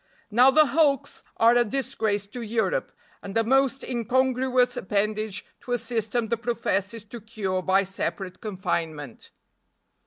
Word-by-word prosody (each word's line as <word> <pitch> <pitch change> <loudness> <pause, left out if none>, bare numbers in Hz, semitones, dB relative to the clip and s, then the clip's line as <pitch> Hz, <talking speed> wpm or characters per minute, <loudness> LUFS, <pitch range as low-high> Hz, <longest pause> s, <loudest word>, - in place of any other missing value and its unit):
Now 245 +5 +6
the 310 +3 +6
hulks 285 -2 +1 0.2
are 230 +1 +5
a 240 - +5
disgrace 215 -4 -1
to 240 +5 -8
Europe, 235 - -1 0.3
and 195 +2 -4
a 225 - +3
most 270 +2 +2
incongruous 255 +1 +1
appendage 210 0 -1
to 245 - -5
a - - +3
system 230 0 -2
that 235 - +1
professes 230 -3 -2
to 230 +2 -10
cure 200 -4 -3
by 190 +1 +3
separate 190 -1 -4
confinement. 165 - -4
225 Hz, 135 wpm, -25 LUFS, 200-250 Hz, 0.3 s, Now